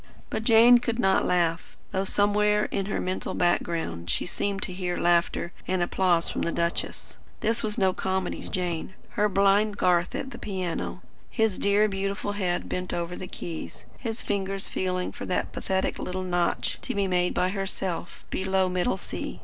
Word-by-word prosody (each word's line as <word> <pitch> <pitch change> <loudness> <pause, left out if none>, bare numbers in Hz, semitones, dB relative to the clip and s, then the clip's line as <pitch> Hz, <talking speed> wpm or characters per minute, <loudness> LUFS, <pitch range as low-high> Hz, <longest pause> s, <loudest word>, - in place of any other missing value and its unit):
But 220 - -2
Jane 235 +2 +8
could 235 -1 -2
not 190 -5 +3
laugh; 170 -2 0
though 190 +1 0
somewhere 210 +1 +3
in 195 -1 -1
her 205 - -1
mental 185 +1 -2
background 165 - 0
she - - 0
seemed 200 +2 -2
to 185 - -2
hear 180 -1 -2
laughter 170 0 +2 0.2
and 185 -1 +1
applause 175 -1 +2
from - - -2
the 170 - 0
duchess. 170 0 -2 0.2
This 225 +2 +1
was 210 -1 -2
no 190 -1 +3
comedy 190 -1 -2
to - - -8
Jane, 180 0 -2
her 210 -1 +1
blind 200 +2 +3
Garth 175 -1 +2
at 265 - -4
the - - -8
piano, 185 -4 -3 0.3
his 220 -5 +1
dear 205 +1 +4
beautiful 195 +1 -2
head 185 -4 -1
bent 180 0 -2
over 175 +1 -3
the 185 - -6
keys, 165 -2 -7
his 230 -2 -4
fingers 195 -1 -1
feeling 185 -1 -1
for - - -7
that 180 - -1
pathetic 190 -1 -1
little 185 +1 -3
notch, 175 -1 0
to - - -3
be 200 -1 +2
made 180 -1 +1
by 180 - +2
herself, 190 -3 -3
below 190 0 +1
middle 180 +5 0
C. - - -6
190 Hz, 175 wpm, -27 LUFS, 180-205 Hz, 0.3 s, Jane